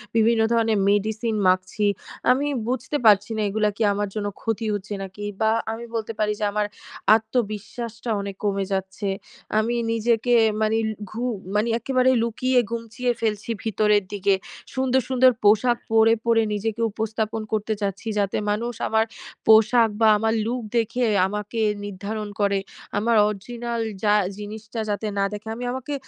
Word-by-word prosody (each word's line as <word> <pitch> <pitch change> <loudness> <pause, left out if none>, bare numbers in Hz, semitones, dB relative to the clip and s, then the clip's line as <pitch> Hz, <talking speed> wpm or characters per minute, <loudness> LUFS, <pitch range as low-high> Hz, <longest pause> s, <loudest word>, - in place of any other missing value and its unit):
বিভিন্ন 225 0 +4
ধরনের 225 -2 +2
মেডিসিন 215 +2 0
মাখছি। 185 +3 +1 0.5
আমি 275 +3 +2 0.2
বুঝতে 255 +4 -1
পারছি 205 0 +5
না - - 0
এগুলো 210 +1 +1
কি 225 - +1
আমার 205 +1 -1
জন্য 205 -1 -2
ক্ষতি 225 0 -2
হচ্ছে 205 +1 -4
নাকি? 195 +2 -7 0.2
বা 220 0 +4 0.2
আমি 230 +1 -6
বলতে 225 0 -2
পারি 210 0 +2
যে, - - -2
আমার 210 0 0 0.5
আত্মবিশ্বাসটা 225 +1 -3
অনেক 200 -1 -5
কমে 200 -1 0
যাচ্ছে। 190 +1 -3 0.5
আমি 235 +2 0 0.2
নিজেকে 230 +1 +1 0.3
মানি 220 +1 +2 0.3
ঘু 230 +3 -4 0.3
মানে 210 +2 +2
একেবারে 255 +2 +2
লুকিয়ে 250 +2 +1
গুমচিয়ে 235 +2 -2
ফেলছি 215 -1 -1
ভিতরের 210 -2 +2
দিকে। 200 0 +2 0.4
সুন্দর, 260 0 +2
সুন্দর 255 0 +5
পোশাক 220 +4 +4
পরে, 225 0 +5
পরে 230 -1 +4
নিজেকে 220 +2 -2
উপস্থাপন 220 0 -2
করতে 215 0 0
চাচ্ছি। 195 -1 -2 0.2
যাতে 200 -1 0
মানুষ 235 +3 -2
আমার 220 0 +2 0.4
পোশাক 220 +1 +6
বা 220 - +6
আমার 220 +1 +1
লুক 245 +2 -2 0.2
দেখে 235 +2 +1 0.2
আমাকে 210 +3 -3 0.2
নির্ধারণ 205 +2 -5
করে। 200 -1 +2 0.4
আমার 225 +2 +2
অরজিনাল 235 +3 -4 0.2
যা 205 -1 +4 0.2
জিনিসটা 215 +2 -7
যাতে 210 +1 -2
না - - +3
দেখে। 210 +1 -7
আমি 245 +1 -5
আমাকে 260 +3 -4
220 Hz, 150 wpm, -24 LUFS, 205-235 Hz, 0.5 s, পোশাক